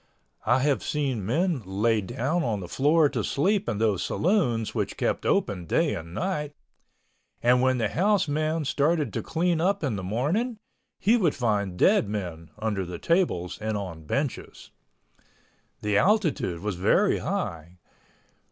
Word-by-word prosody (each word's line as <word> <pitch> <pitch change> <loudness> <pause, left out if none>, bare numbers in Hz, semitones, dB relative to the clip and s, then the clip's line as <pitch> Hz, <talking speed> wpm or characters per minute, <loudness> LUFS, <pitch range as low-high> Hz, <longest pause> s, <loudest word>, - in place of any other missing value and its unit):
I 130 - +4
have 140 0 +1
seen 135 -8 -2
men 165 - +1
lay 105 +4 +1
down 135 - -1
on 110 -7 -1
the 90 - -7
floor 150 - +3
to 120 -6 -2
sleep 195 +8 +1
in - - -1
those 105 -4 +1
saloons 135 - 0
which - - -2
kept - - -1
open 90 -4 0
day - - +2
and 85 0 -6
night, 150 -6 -2 0.9
and 125 +1 +4
when 130 0 +2
the 115 - +1
house 200 +1 +2
man 155 +1 -1
started 145 - +1
to - - -2
clean 165 0 0
up 195 +1 +1
in 125 -8 -1
the 95 - -5
morning 155 - -1 0.4
he 225 +4 +3
would 175 -10 +1
find 105 -7 -1
dead 190 - +4
men 85 -6 -5
under 105 -3 -1
the 90 -1 -6
tables 165 - 0
and 110 -1 -1
on 90 -5 -6
benches. 140 - -3 1.1
The 105 -1 +2
altitude 180 - +1
was 105 -3 -3
very 145 - +3
high. 90 - -4
130 Hz, 155 wpm, -26 LUFS, 100-165 Hz, 1.1 s, I